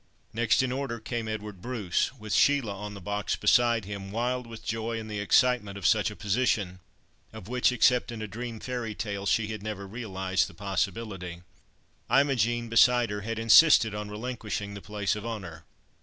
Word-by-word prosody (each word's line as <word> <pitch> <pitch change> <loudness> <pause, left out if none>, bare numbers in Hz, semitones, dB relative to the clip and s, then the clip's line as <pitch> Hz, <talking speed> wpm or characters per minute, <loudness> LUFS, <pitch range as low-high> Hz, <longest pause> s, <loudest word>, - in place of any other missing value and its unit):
Next 115 +1 +2
in 130 - -1
order 130 -3 -3
came 115 0 -4
Edward 105 -3 -6
Bruce, 110 -7 -1
with 110 -4 -6
Sheila 135 -8 +3
on 105 +1 -7
the - - -8
box 100 +2 -2
beside 120 -3 +3
him, 100 -1 -6
wild 120 +3 -2
with 115 -1 -10
joy 115 +1 -2
and 110 - -7
the 105 - -3
excitement 105 -1 +2
of 100 - -7
such 105 -5 +3
a - - -9
position, 100 -1 0 0.5
of 90 - -10
which, 125 +1 +2
except 125 -1 +3
in 115 - -6
a 110 - -4
dream 115 +2 -6
fairy 120 -4 -4
tale, 100 -2 -4
she 110 +1 +1
had 110 -2 -5
never 105 -2 -5
realised 95 -3 -2
the - - -14
possibility. 95 -2 -3 0.7
Imogen, 120 -3 +2
beside 120 0 +4
her, 105 0 -3
had 115 +2 -4
insisted 115 0 +6
on 105 0 -5
relinquishing 105 -2 -4
the 100 - -8
place 105 -1 -2
of 105 - -6
honour. 95 -8 -6
110 Hz, 180 wpm, -28 LUFS, 100-120 Hz, 0.7 s, insisted